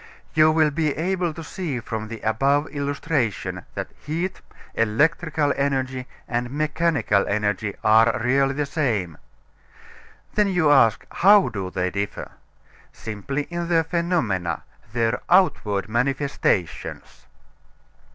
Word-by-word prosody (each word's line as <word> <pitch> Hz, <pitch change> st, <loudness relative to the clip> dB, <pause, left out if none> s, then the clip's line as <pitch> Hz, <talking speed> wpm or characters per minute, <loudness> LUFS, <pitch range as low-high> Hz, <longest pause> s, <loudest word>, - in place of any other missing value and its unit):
You 155 Hz, 0 st, +5 dB
will 155 Hz, -1 st, +3 dB
be 155 Hz, -1 st, -1 dB
able 180 Hz, +1 st, 0 dB
to 165 Hz, +1 st, -8 dB
see 155 Hz, -5 st, -4 dB
from 110 Hz, -2 st, -5 dB
the 115 Hz, 0 st, -8 dB
above 140 Hz, +7 st, +1 dB
illustration 140 Hz, -, -2 dB
that -, -, -5 dB
heat, 170 Hz, +5 st, -3 dB, 0.3 s
electrical 150 Hz, +6 st, +1 dB
energy, 130 Hz, -2 st, -1 dB, 0.2 s
and 120 Hz, 0 st, -2 dB
mechanical 150 Hz, -6 st, +1 dB
energy 105 Hz, 0 st, -1 dB
are 110 Hz, +1 st, +5 dB
really 135 Hz, +3 st, +2 dB
the 145 Hz, 0 st, 0 dB
same. 115 Hz, -, -1 dB, 1.1 s
Then 210 Hz, -1 st, +3 dB
you 180 Hz, -6 st, +3 dB
ask, 115 Hz, -6 st, +4 dB
how 200 Hz, -3 st, +5 dB
do 95 Hz, -5 st, -4 dB
they 90 Hz, 0 st, -2 dB
differ? 100 Hz, +1 st, -4 dB, 0.6 s
Simply 110 Hz, +7 st, -4 dB
in 170 Hz, +2 st, -4 dB
their 165 Hz, -1 st, +3 dB
phenomena 160 Hz, -, -1 dB, 0.3 s
their 115 Hz, +1 st, 0 dB
outward 110 Hz, -, +2 dB
manifestations. 125 Hz, -, -2 dB
140 Hz, 115 wpm, -23 LUFS, 110-160 Hz, 1.1 s, You